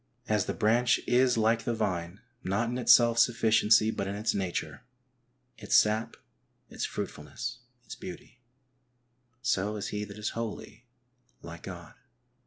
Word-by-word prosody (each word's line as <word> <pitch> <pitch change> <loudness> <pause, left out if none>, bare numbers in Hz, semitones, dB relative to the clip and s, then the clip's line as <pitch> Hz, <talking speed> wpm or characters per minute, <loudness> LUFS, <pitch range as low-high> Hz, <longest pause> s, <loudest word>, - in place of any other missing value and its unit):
As 105 -3 +1
the - - -2
branch 120 +2 +3
is 125 0 +3
like 115 +1 +2
the 120 - -1
vine, 95 -4 -3 0.2
not 105 +5 0
in 125 +1 -3
its 125 - +4
self 115 -1 +6
sufficiency, 110 -2 +4
but 100 -3 -3
in 100 - -3
its 105 +2 -1
nature, 85 -6 -3 0.8
its - - 0
sap, 110 +2 +3 0.5
its - - -3
fruitfulness, 125 0 -6 0.3
its 110 - -8
beauty, 175 -9 -10 1.0
so 105 -3 0
is 105 - -4
he 105 0 -3
that 100 0 -11
is 105 0 -2
holy 115 +1 -7 0.6
like - - -9
God. - - -9
110 Hz, 145 wpm, -29 LUFS, 105-120 Hz, 1.0 s, self